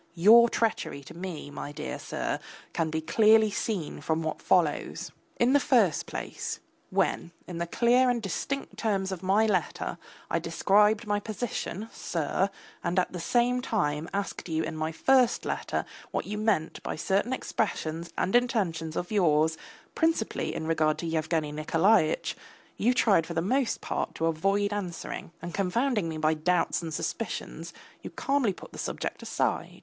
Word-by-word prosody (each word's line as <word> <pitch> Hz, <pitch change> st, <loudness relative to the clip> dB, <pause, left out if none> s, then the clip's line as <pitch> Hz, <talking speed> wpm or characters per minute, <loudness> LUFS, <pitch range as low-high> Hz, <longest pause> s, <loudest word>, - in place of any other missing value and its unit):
Your 225 Hz, +7 st, +7 dB
treachery 220 Hz, -12 st, -1 dB
to -, -, -11 dB
me, 170 Hz, -5 st, -6 dB
my 145 Hz, -, -6 dB
dear 150 Hz, +1 st, -5 dB
sir, -, -, -3 dB, 0.3 s
can 160 Hz, -1 st, 0 dB
be 160 Hz, 0 st, -2 dB
clearly 215 Hz, +5 st, +5 dB
seen 195 Hz, -6 st, -3 dB
from 160 Hz, 0 st, 0 dB
what 155 Hz, -, -3 dB
follows. -, -, +1 dB, 0.3 s
In 240 Hz, +3 st, +4 dB
the 285 Hz, -, +6 dB
first 220 Hz, -, +3 dB
place, -, -, -5 dB, 0.3 s
when, -, -, 0 dB, 0.2 s
in 175 Hz, -2 st, -6 dB
the 170 Hz, -, -1 dB
clear 245 Hz, +6 st, +4 dB
and 245 Hz, -1 st, +1 dB
distinct 255 Hz, +7 st, -4 dB
terms 195 Hz, -3 st, 0 dB
of 185 Hz, -2 st, -4 dB
my 195 Hz, +4 st, +3 dB
letter, 200 Hz, -5 st, -1 dB, 0.3 s
I -, -, 0 dB
described 210 Hz, +3 st, +3 dB
my 205 Hz, 0 st, +1 dB
position, 215 Hz, -1 st, -4 dB
sir, 175 Hz, +4 st, -1 dB, 0.3 s
and 180 Hz, -, -1 dB
at 180 Hz, -, +2 dB
the 180 Hz, -, -4 dB
same 245 Hz, +7 st, +2 dB
time 165 Hz, -, -1 dB
asked 200 Hz, -2 st, -3 dB
you 160 Hz, 0 st, 0 dB
in -, -, -4 dB
my 155 Hz, +1 st, -2 dB
first 255 Hz, +7 st, +3 dB
letter -, -, -2 dB, 0.2 s
what -, -, -2 dB
you 210 Hz, -, -4 dB
meant 210 Hz, -7 st, 0 dB
by -, -, -4 dB
certain 195 Hz, +9 st, 0 dB
expressions 170 Hz, -9 st, -2 dB
and 190 Hz, -, +1 dB
intentions 185 Hz, -10 st, +1 dB
of 180 Hz, -, -3 dB
yours, 160 Hz, -5 st, +3 dB, 0.4 s
principally 320 Hz, -9 st, 0 dB
in -, -, -3 dB
regard 155 Hz, -1 st, +2 dB
to -, -, -5 dB
Yevgeny 160 Hz, -1 st, 0 dB
Nikolaitch, 160 Hz, +4 st, +2 dB, 0.4 s
you 245 Hz, +4 st, +2 dB
tried 195 Hz, -9 st, +4 dB
for 170 Hz, -, -5 dB
the 165 Hz, -, +2 dB, 0.2 s
most 235 Hz, -4 st, -2 dB
part -, -, -3 dB
to 165 Hz, -, -1 dB
avoid 195 Hz, +6 st, +1 dB
answering, 185 Hz, -5 st, -5 dB
and 175 Hz, 0 st, -5 dB
confounding 205 Hz, 0 st, +1 dB
me 160 Hz, -, -4 dB
by 155 Hz, 0 st, +2 dB
doubts 175 Hz, +4 st, +1 dB
and 165 Hz, -1 st, -5 dB
suspicions, 150 Hz, -, -4 dB, 0.3 s
you -, -, -7 dB
calmly 275 Hz, -6 st, +1 dB
put 185 Hz, -, -11 dB
the -, -, -10 dB
subject -, -, -3 dB
aside. -, -, -2 dB
190 Hz, 165 wpm, -28 LUFS, 160-220 Hz, 0.4 s, Your